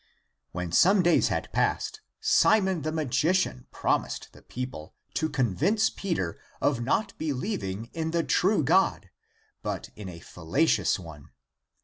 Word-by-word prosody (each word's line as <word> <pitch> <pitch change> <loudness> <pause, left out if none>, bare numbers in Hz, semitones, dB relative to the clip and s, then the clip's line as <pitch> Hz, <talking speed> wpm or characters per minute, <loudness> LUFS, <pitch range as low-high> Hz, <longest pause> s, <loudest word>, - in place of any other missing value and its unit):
When 90 -1 -4
some 190 - +5
days 175 0 +4
had - - -2
passed - - 0 0.2
Simon 190 -6 +3
the 155 +2 -2
Magician 155 -1 0
promised - - -1
the - - -16
people 125 -11 -7 0.2
to 160 - 0
convince 145 - +1
Peter 165 - -3 0.2
of 130 -5 +1
not 200 - 0
believing 120 - -3
in 160 -1 -2
the 170 0 +1
true 190 -1 +2
God, 155 - +2 0.5
but - - -4
in 105 -3 -7
a 85 -2 -9
fallacious 90 - +1
one. 80 -6 -11
150 Hz, 130 wpm, -27 LUFS, -, 0.5 s, some